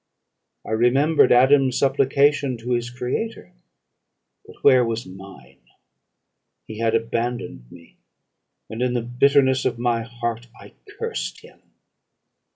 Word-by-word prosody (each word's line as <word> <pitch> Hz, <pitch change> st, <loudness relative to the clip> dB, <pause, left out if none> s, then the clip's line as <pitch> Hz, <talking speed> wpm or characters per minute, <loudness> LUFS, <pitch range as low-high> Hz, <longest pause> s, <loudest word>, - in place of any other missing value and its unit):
I -, -, -7 dB
remembered 130 Hz, +7 st, +3 dB
Adam's 130 Hz, +1 st, +4 dB
supplication 140 Hz, 0 st, +1 dB
to 120 Hz, +2 st, -7 dB
his 120 Hz, 0 st, -1 dB
Creator. 125 Hz, -, -5 dB, 0.9 s
But -, -, -14 dB
where 130 Hz, -3 st, +6 dB
was 115 Hz, 0 st, -3 dB
mine? 95 Hz, +1 st, -14 dB, 1.0 s
He 110 Hz, 0 st, -9 dB
had 115 Hz, 0 st, +1 dB
abandoned 115 Hz, -, -4 dB
me 85 Hz, -1 st, -17 dB, 0.7 s
and, 110 Hz, +2 st, -7 dB
in 125 Hz, 0 st, 0 dB
the 120 Hz, -, -1 dB
bitterness 130 Hz, +2 st, +2 dB
of -, -, -1 dB
my 120 Hz, -1 st, 0 dB
heart, 120 Hz, 0 st, -5 dB
I -, -, -15 dB, 0.2 s
cursed -, -, -5 dB
him. -, -, -18 dB
120 Hz, 120 wpm, -22 LUFS, 115-130 Hz, 1.0 s, where